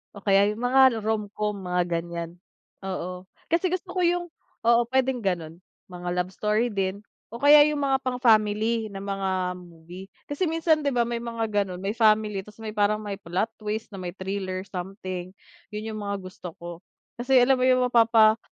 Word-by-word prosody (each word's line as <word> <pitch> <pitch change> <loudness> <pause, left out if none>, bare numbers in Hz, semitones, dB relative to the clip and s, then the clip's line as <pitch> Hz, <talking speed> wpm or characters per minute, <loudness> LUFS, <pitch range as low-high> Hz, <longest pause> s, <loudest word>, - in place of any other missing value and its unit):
O 200 - -10
kaya 200 0 +4
yung 225 - -9
mga 250 -2 +4
romcom 210 -1 -2
mga 180 -2 -1
ganyan, 170 0 -4 0.5
oo. 185 -1 -5 0.2
Kasi 335 +3 +1
gusto 370 0 -4
ko - - +2
yung 350 0 +1 0.4
oo, 235 +1 +4
pwedeng 260 -3 +1
ganon, 170 -3 -2 0.3
mga 175 -1 -5
love 180 0 -1
story 210 +4 0
din 195 0 -2 0.3
o 235 - -7
kaya 290 +1 +8
yung 300 -1 -1
mga 270 -1 +2
pang-family 220 -3 +2
na 195 - -6
mga 190 -2 -2
movie. 175 +1 -12 0.2
Kasi 290 +6 -1
minsan 320 -2 +1
'di 280 - +1
ba, 245 - +2
may 235 0 -1
mga 230 -1 -3 0.2
ganon, 180 -1 -7
may 200 +4 -3
family 215 -3 +2
tas 210 +1 -15
may 220 - -5
parang 210 +1 +2
may 205 -2 -5
plot 190 +3 -2
twist 215 +1 -4
na 195 - -9
may 180 -2 -5
thriller 190 0 -4
something, 185 -1 -6 0.4
yun 210 +1 -5
yung 215 - -5
mga 200 -1 -4
gusto 185 -2 -9
ko, 170 -1 -7 0.4
kasi 250 +3 -1
alam 260 +2 +4
mo 255 - +1
yung 255 0 +4
mapapa 225 -2 +5
210 Hz, 180 wpm, -25 LUFS, 185-235 Hz, 0.5 s, kaya